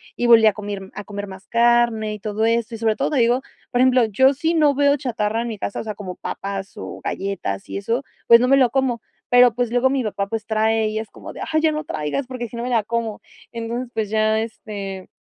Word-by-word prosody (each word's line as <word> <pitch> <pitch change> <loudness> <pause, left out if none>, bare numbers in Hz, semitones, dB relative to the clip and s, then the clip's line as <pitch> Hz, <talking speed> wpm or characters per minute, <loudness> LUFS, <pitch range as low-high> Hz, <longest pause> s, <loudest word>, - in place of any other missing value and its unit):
Y 240 - 0
volví 230 -2 +7
a 210 - +4
comir 205 -2 -6
A 205 - -7
comer 205 0 -6
más 190 +1 -11
carne 235 -2 +2
y 210 - -7
todo 215 +1 -1
eso. 230 0 0
Y - - -6
sobre 220 -1 +1
todo, - - 0
te 290 - 0
digo 240 +2 +3 0.3
Por 245 - 0
ejemplo, 255 -1 +5
yo 265 +6 +4
si 320 +5 0
no 300 -3 +3
veo 285 +1 +3
chatarra 225 -4 -1
en - - -4
mi 220 - -5
casa, 200 - -4
o - - -4
sea, 215 -2 -5
como 190 -3 -7
papas 195 0 -5
o 210 - -7
galletas, 195 0 -3
y - - -4
eso, 230 +7 -1 0.2
pues 235 - +9
no 250 - +3
me 275 - +6
lo 255 -3 +4
como. 255 -2 0 0.3
Pero 245 -1 +6
pues, 245 -2 -1
luego 245 +2 +3
mi 265 -2 0
papá, 200 -2 -2
pues 220 0 -4
trae, 220 0 +1
y 215 0 -2
es 220 - -6
como - - -10
de: - - -10
"Ay, 315 0 +2
ya 315 - +3
no 305 0 -3
traigas, 155 - -3
porque 245 -2 -5
si - - -10
no, 235 - -3
me 250 - -3
la 230 -3 +2
como". 225 -1 -3 0.3
Entonces, 235 +2 -4
pues 220 -2 -2
ya 215 0 +2
este 200 -4 -6
225 Hz, 250 wpm, -21 LUFS, 210-245 Hz, 0.3 s, pues